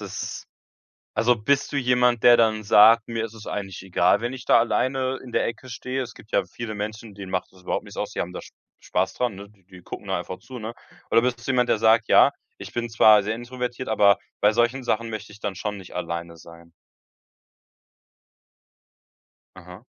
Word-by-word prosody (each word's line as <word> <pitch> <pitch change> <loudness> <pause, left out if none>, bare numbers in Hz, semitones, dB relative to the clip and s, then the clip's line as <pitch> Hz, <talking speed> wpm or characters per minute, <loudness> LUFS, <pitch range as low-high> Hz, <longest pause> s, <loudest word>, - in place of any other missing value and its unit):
es - - -6 0.7
also, 120 +2 +3
bist 135 +6 0
du - - 0
jemand, 125 -2 +2
der 120 -1 +8
dann 110 -2 +2
sagt: 110 +2 +6
„Mir 115 -1 -2
ist 115 - -11
es 110 -1 -12
eigentlich 95 -3 -5
egal, 90 0 +2
wenn 120 +2 -3
ich 130 -1 -9
da - - +5
alleine 130 +2 0
in 125 - -11
der - - +1
Ecke 115 +2 -6
stehe“? 130 +2 -4
Es 120 -1 -10
gibt 110 - -17
ja - - +1
viele 110 -2 -7
Menschen, 105 +1 -6
denen 95 -2 -9
macht 90 - -2
das 95 -1 -20
überhaupt - - -2
nichts - - -13
aus. - - -3
Die - - -6
haben - - -3
da - - -6
Sp - - -15 0.3
Spaß 95 +1 -1
dran, 125 -3 -1
ne? 100 +1 -11
Die 100 -3 -27
die 90 -1 -15
gucken - - -9
da - - 0
einfach 90 - -7
zu, 130 -2 -10
ne? 110 +1 -6 0.4
Oder 115 - +4
bist 125 -2 -1
du - - +2
jemand, 125 -1 +1
der 105 - +2
sagt: 110 0 +4
„Ja, - - +6 0.3
ich - - -9
bin 120 0 -2
zwar 110 -2 +6
sehr 110 - -2
introvertiert, 125 +1 -5
aber 100 -3 +5 0.2
bei 105 - +5
solchen 120 +3 +1
Sachen 115 -1 -1
möchte 110 -1 -7
ich 105 - -14
dann 100 -3 -4
schon 105 +1 -4
nicht 95 -2 -12
alleine 85 -1 -5
sein“? 85 +1 -15 2.8
Aha. 90 +3 -13
110 Hz, 210 wpm, -24 LUFS, 100-120 Hz, 2.8 s, der